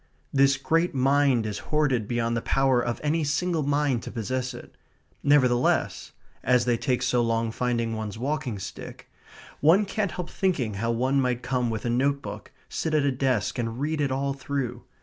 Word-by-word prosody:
This 140 0 +4
great 165 +4 +1
mind 135 -2 +3
is 105 -1 -3
hoarded 140 -8 +1
beyond 115 0 0
the 115 - -1
power 135 -2 +2
of 120 -1 -2
any 155 +2 +1
single 160 +3 0
mind 145 -3 +1
to - - -7
possess 125 +2 -2
it. - - -12 0.5
Nevertheless 130 -4 +2 0.3
(as 125 -1 +3
they 120 -1 +2
take 125 +2 -1
so 125 -1 +2
long 115 -1 0
finding 115 -1 -1
one's 110 -1 -5
walking 135 -2 -2
stick) 95 - -9 0.5
one 175 +8 +5
can't 200 -1 -2
help 180 -2 -5
thinking 155 - 0
how 115 +4 -2
one 130 +4 +1
might 125 -1 -1
come 125 -1 0
with 110 -1 -4
a - - 0
notebook, 140 +3 -1 0.2
sit 160 -1 -2
at 150 - +3
a 140 - +3
desk, 130 -4 0
and 115 0 -3
read 150 +2 -1
it 140 -2 0
all 135 +1 -1
through. 130 -3 -4
130 Hz, 180 wpm, -26 LUFS, 120-145 Hz, 0.5 s, one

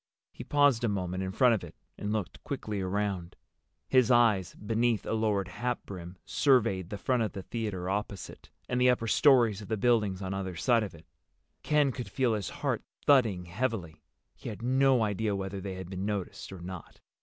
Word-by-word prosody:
He - - -9
paused 145 -5 +3
a 115 - +2
moment 95 -2 -2
in 95 0 -3
front 125 +4 +4
of 110 - -1
it 85 - -10 0.2
and 105 - -4
looked 105 -4 -3
quickly 105 -2 -4
around. 95 -2 -2 0.5
His 130 -3 +4
eyes, 115 -7 +3
beneath 115 +1 0
a - - -2
lowered 105 -4 0
hatbrim, 95 -6 -5
surveyed 115 - +2
the 105 - -4
front 125 +4 0
of 110 - -1
the 95 - -6
theater 105 -6 -4
opposite, 100 -1 -4 0.2
and 125 0 0
the 125 - +6
upper 125 -2 +2
stories 115 -4 +4
of 105 - -9
the 110 - -1
buildings 105 -4 +2
on 95 0 -3
either 95 -2 -4
side 115 +9 +3
of 100 -6 -5
it. 80 0 -16 0.6
Ken 150 -2 +2
could 120 -4 -6
feel 125 +2 +1
his 105 -5 -2
heart - - -2 0.2
thudding 115 -11 +4
heavily. 90 -5 -3 0.3
He - - -7
had 110 +2 -8
no 130 -1 +4
idea 105 0 0
whether 95 0 -4
they 95 -1 -5
had 95 -1 -7
been 95 0 -5
noticed 100 -3 -4
or 95 -2 -9
not. 90 -2 -9
105 Hz, 190 wpm, -30 LUFS, 95-120 Hz, 0.6 s, the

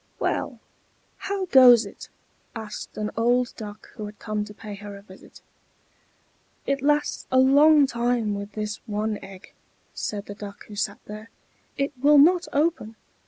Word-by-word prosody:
"Well, - - -2 0.6
how 395 -1 -3
goes 250 - +7
it?" 200 - -11 0.5
asked 220 -2 -8
an 210 0 -3
old 240 +2 +1
Duck 210 -1 -9
who 215 -2 -6
had 210 0 -12
come 215 -1 -3
to 210 - -11
pay 210 0 -9
her 205 0 -9
a 200 - -14
visit. 190 -2 -16 1.2
"It 275 0 -1
lasts 295 +1 0
a 260 - +3
long 285 +3 +6
time 235 -3 -1
with 200 0 -6
this 210 -1 -4
one 210 0 -2
egg," 195 0 -13 0.4
said 205 -1 -4
the 205 - -7
Duck 205 -1 -10
who 210 - -11
sat 200 0 -2
there. 215 +2 -9 0.5
"It 275 +1 -1
will 295 +1 +6
not 345 +5 +5
open. 290 -7 0
220 Hz, 160 wpm, -24 LUFS, 210-275 Hz, 1.2 s, goes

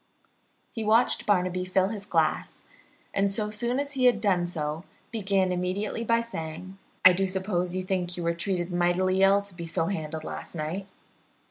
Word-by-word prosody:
He 225 - -4
watched 225 +3 +3
Barnaby 185 -2 +2
fill 185 +1 +1
his 205 -2 -6
glass, - - 0 0.5
and 200 0 +2
so 210 +1 -1
soon 240 +4 -1
as 285 0 -3
he 260 -2 +1
had 245 -4 +5
done 185 -5 +2
so 155 -1 -3 0.3
began 195 -4 +1
immediately 185 +5 -2
by 230 0 +2
saying: 185 -3 -7 0.3
"I 185 - +10
do 190 +2 +1
suppose 185 -2 -1
you 185 - -1
think 180 -1 -2
you 175 - -3
were 170 0 +1
treated 175 0 -2
mightily 180 +2 +2
ill 195 +1 +5
to 200 -1 -11
be 170 -1 -7
so 165 0 0
handled 160 -4 -4
last - - -7
night. 170 +5 -4
185 Hz, 175 wpm, -27 LUFS, 175-205 Hz, 0.5 s, I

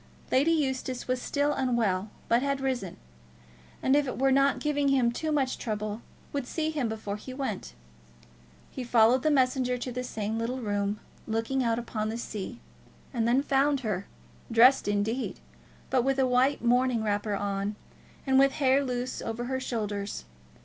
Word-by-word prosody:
Lady 275 +5 +4
Eustace 265 -5 -1
was 255 0 0
still 290 +2 0
unwell, 220 -7 0 0.2
but 235 +1 +3
had 275 0 0
risen; 255 -9 -2 0.9
and 265 - +4
if 290 -1 +3
it 255 - -4
were 270 +1 +3
not 275 +1 +4
giving 290 -1 0
him 260 -4 +3
too 310 +6 -2
much 275 -4 0
trouble, 215 0 -3 0.3
would 280 -3 -2
see 315 +2 -1
him 280 -7 -1
before 215 -2 -4
he 255 +4 -9
went. 215 - -4 1.0
He 260 - -5
followed 240 +1 +4
the 310 - +2
messenger 255 -3 +2
to 250 +1 -4
the 250 +1 -3
same 220 -2 -3
little 245 +3 -2
room, 205 -2 -1 0.3
looking 225 +4 0
out 230 -1 +1
upon 220 -2 -3
the 225 - -3
sea, 225 0 -6 0.5
and 230 -2 +1
then 255 +4 +3
found 280 0 +2
her, 200 -5 -2 0.4
dressed 240 +3 +6
indeed, 205 +5 -1 0.5
but 255 -2 +3
with 270 +1 +1
a 265 - +3
white 255 +2 +2
morning 245 -1 +3
wrapper 205 0 0
on, 200 +1 -2 0.5
and 265 -1 +4
with 275 0 +5
hair 275 -1 +3
loose 250 -1 -3
over 225 +1 -4
her 260 +1 -2
shoulders. 205 - -3
250 Hz, 170 wpm, -28 LUFS, 220-270 Hz, 1.0 s, dressed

